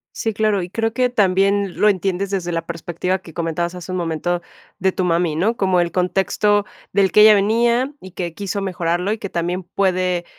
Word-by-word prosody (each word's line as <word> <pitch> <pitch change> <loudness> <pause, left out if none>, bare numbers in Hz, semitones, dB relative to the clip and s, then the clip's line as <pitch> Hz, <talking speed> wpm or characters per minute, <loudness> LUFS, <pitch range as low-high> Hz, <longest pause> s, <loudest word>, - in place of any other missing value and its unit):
Sí, 225 - -1
claro, 210 -2 +1
y 175 - -6
creo 225 +2 -1
que 250 +1 +1
también 200 -2 +1
lo 210 - +6
entiendes 195 0 -1
desde 185 -3 -2
la 165 -1 -3
perspectiva 170 +2 -2
que 175 -4 -14
comentabas 170 +1 -2
hace 180 +1 -8
un 185 - -2
momento 170 +1 -2 0.3
de 190 +1 +1
tu 185 - -2
mami, 170 -2 +1
¿no? 215 +8 0
como 190 -2 +2
el 170 - -1
contexto 195 +3 +1 0.3
del 190 -2 +2
que 210 - +6
ella 215 0 +9
venía 235 +6 +2
y 185 - -11
que 170 -2 -5
quiso 200 0 -3
mejorarlo, 180 0 -1
y 220 - -1
que 200 -2 -6
también 175 +2 -2
puede, 185 -1 0
185 Hz, 200 wpm, -20 LUFS, 175-205 Hz, 0.3 s, ella